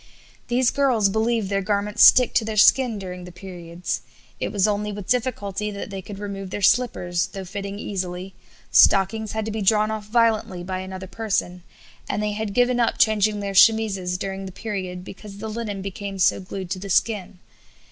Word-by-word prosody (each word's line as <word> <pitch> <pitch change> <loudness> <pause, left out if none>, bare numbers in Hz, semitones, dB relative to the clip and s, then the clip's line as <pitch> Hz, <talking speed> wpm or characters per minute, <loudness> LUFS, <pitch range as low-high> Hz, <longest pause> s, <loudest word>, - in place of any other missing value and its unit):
These 245 0 +2
girls 250 -8 +2
believe 220 0 0
their 195 0 0
garments 205 +1 +1
stick 250 -2 +7
to - - +3
their 215 0 -4
skin 240 +1 +5
during 180 -2 -7
the 180 - -10
periods; 175 -1 -6 0.4
it - - -2
was 200 0 +2
only 210 0 -1
with 205 -2 -7
difficulty 220 -4 -1
that 200 0 -7
they 195 -1 -5
could 200 +1 -9
remove 195 -1 -6
their 200 - -5
slippers, 180 -7 +2
though 195 -1 -8
fitting 200 +1 -6
easily; 185 -2 -5 0.4
stockings 200 +3 +4
had 220 -1 -2
to 220 - -3
be 215 0 -3
drawn 215 +2 +3
off 215 -1 -5
violently 220 -5 +1
by 185 +1 -4
another 190 0 -7
person, 190 -3 -2 0.5
and 210 +1 -1
they 210 - 0
had 210 -1 -4
given 245 0 +3
up 235 - +1
changing 215 -2 +2
their 200 -1 -3
chemises 195 -3 +4
during 195 +1 -5
the - - -8
period 185 -3 -5
because 200 0 -10
the 220 +2 -6
linen 215 -3 -4
became 195 0 -6
so 185 - +3
glued 190 -1 -7
to 185 - -2
the 200 +1 -7
skin. 195 -1 0
200 Hz, 190 wpm, -23 LUFS, 190-220 Hz, 0.5 s, stick